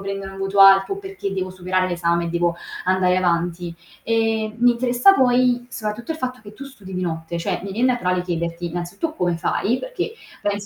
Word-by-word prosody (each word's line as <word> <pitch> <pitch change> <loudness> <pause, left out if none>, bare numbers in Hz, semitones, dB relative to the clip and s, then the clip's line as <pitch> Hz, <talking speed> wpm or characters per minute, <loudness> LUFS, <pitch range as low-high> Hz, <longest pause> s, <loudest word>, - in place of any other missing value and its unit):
prendere 195 0 -5
un 195 - -10
voto 195 +1 0
alto, 195 - +7
o - - -10
perché 385 - -5
devo 185 -1 -3
superare 185 0 -1
l'esame, 170 -1 0
e 170 - -3
devo 170 0 0 0.3
andare 185 0 +2
avanti. 175 -1 0 0.3
Ehm, 225 -1 0
mi 245 +1 +5
interessa 245 +9 +4
poi, 245 -2 +3
soprattutto 215 +4 -5
il 315 - -3
fatto 255 -2 -4
che 205 - -12
tu 265 +6 -9
studi 210 -9 -12
di 180 - -2
notte, 165 -1 -3
cioè, 180 +2 -2
mi 195 - -5
vien 235 +6 +1
naturale 185 -8 +1
chiederti, 170 -1 -3
innanzitutto, 175 - -4
come 175 - 0
fai? 225 +8 0
Perché - - -4 0.3
penso 205 0 -1
195 Hz, 195 wpm, -22 LUFS, 175-240 Hz, 0.3 s, alto